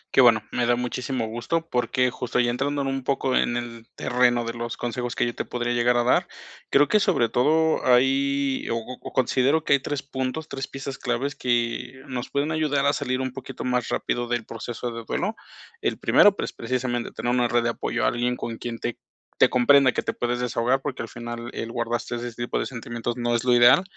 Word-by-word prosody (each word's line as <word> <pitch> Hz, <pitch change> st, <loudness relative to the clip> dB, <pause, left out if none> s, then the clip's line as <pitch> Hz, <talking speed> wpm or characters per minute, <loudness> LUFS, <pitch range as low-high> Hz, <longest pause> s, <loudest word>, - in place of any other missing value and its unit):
Qué -, -, +8 dB
bueno, 115 Hz, -4 st, +5 dB
me 120 Hz, -1 st, 0 dB
da 120 Hz, -, +4 dB
muchísimo 125 Hz, 0 st, -2 dB
gusto, 125 Hz, +9 st, -2 dB
porque 125 Hz, +1 st, +1 dB
justo 125 Hz, -1 st, -2 dB
ya 120 Hz, -1 st, +3 dB
entrando 140 Hz, +3 st, -1 dB
en 135 Hz, -, -2 dB
un 135 Hz, 0 st, -2 dB
poco 135 Hz, -1 st, 0 dB
en 120 Hz, -, +2 dB
el 115 Hz, -1 st, -7 dB
terreno 120 Hz, -1 st, +2 dB
de 115 Hz, -, -3 dB
los 120 Hz, 0 st, -5 dB
consejos 120 Hz, 0 st, -3 dB
que -, -, +1 dB
yo 120 Hz, -, -2 dB
te -, -, -3 dB
podría 120 Hz, 0 st, -2 dB
llegar 120 Hz, 0 st, +3 dB
a 120 Hz, -, +3 dB
dar. 125 Hz, -, +3 dB, 0.4 s
Creo 145 Hz, +1 st, +5 dB
que 215 Hz, -, +4 dB
sobre 180 Hz, -, +2 dB
todo 160 Hz, +5 st, +2 dB
hay 135 Hz, +2 st, +2 dB
o 115 Hz, -, 0 dB
o 125 Hz, +2 st, -7 dB
considero 135 Hz, +4 st, +2 dB
que -, -, +3 dB
hay 140 Hz, -, +5 dB
3 140 Hz, +1 st, -4 dB
puntos, 135 Hz, +3 st, -4 dB
3 135 Hz, 0 st, -5 dB
piezas 135 Hz, 0 st, -6 dB
claves 125 Hz, +4 st, -1 dB
que, 120 Hz, +2 st, -1 dB
nos 130 Hz, -2 st, -4 dB
pueden 145 Hz, +2 st, -1 dB
ayudar 150 Hz, -3 st, +1 dB
a 140 Hz, -, +4 dB
salir 130 Hz, -1 st, -1 dB
un 130 Hz, 0 st, -2 dB
poquito 135 Hz, 0 st, -7 dB
más 125 Hz, -1 st, 0 dB
rápido 120 Hz, 0 st, -1 dB
del 120 Hz, -2 st, -1 dB
proceso 120 Hz, +1 st, -5 dB
de 115 Hz, 0 st, -6 dB
duelo. 210 Hz, -, -2 dB, 0.5 s
El -, -, -1 dB
primero, 205 Hz, -1 st, +5 dB
pues, -, -, -4 dB
precisamente 120 Hz, 0 st, -2 dB
tener 120 Hz, -, -2 dB
una 125 Hz, -1 st, +3 dB
red 120 Hz, 0 st, +2 dB
de 120 Hz, -, +1 dB
apoyo, 115 Hz, -, -1 dB
a -, -, +5 dB
alguien 120 Hz, +1 st, -1 dB
con 115 Hz, -1 st, -5 dB
quien 120 Hz, -1 st, -5 dB
te 120 Hz, -, -3 dB, 0.4 s
te -, -, +6 dB
comprenda, 130 Hz, +1 st, +5 dB
que -, -, -1 dB
te -, -, -2 dB
puedas 120 Hz, 0 st, -2 dB
desahogar, 125 Hz, +2 st, +1 dB
porque 140 Hz, -1 st, -4 dB
al 115 Hz, -, -6 dB
final 120 Hz, 0 st, -6 dB
el 115 Hz, -, -4 dB
guardarse 120 Hz, 0 st, -2 dB
ese 120 Hz, 0 st, -4 dB
tipo 120 Hz, +1 st, -2 dB
de -, -, -2 dB
sentimientos 120 Hz, -1 st, -5 dB
no 120 Hz, -1 st, 0 dB
es 115 Hz, -, 0 dB
lo 125 Hz, -1 st, +3 dB
ideal, 120 Hz, +8 st, +7 dB
125 Hz, 220 wpm, -25 LUFS, 120-135 Hz, 0.5 s, Qué